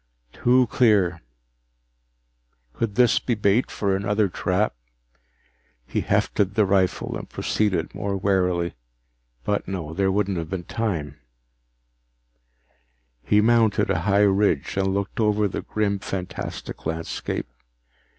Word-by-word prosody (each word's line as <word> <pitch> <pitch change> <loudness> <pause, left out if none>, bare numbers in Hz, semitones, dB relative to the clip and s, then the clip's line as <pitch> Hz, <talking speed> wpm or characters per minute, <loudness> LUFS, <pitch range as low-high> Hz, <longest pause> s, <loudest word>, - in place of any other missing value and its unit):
Too 125 +1 +3
clear! 100 -9 +2 1.5
Could 105 - -2
this 125 -1 +4
be 120 - -1
bait 105 +3 +2
for 100 -2 0
another 100 +1 +1
trap? 95 +4 0 1.1
He - - -2
hefted 100 -1 0
the 110 -2 +4
rifle 95 -1 +1
and - - -7
proceeded 95 -6 -1
more 100 -1 -2
warily. 90 -3 +1 0.7
But 105 - -1
no, 85 -5 -4
there 95 +2 +1
wouldn't 100 -1 0
have 80 -1 -5
been 95 -1 -4
time 85 -9 -3 2.0
He 105 +9 +3
mounted 115 -1 +3
a - - +1
high 100 +1 +3
ridge 100 -7 +1
and 95 -1 +1
looked 100 +2 -3
over 105 -1 +2
the 95 - -4
grim, 100 -2 -1
fantastic 95 -2 -6
landscape. 80 +1 -3
100 Hz, 120 wpm, -24 LUFS, 90-105 Hz, 2.0 s, this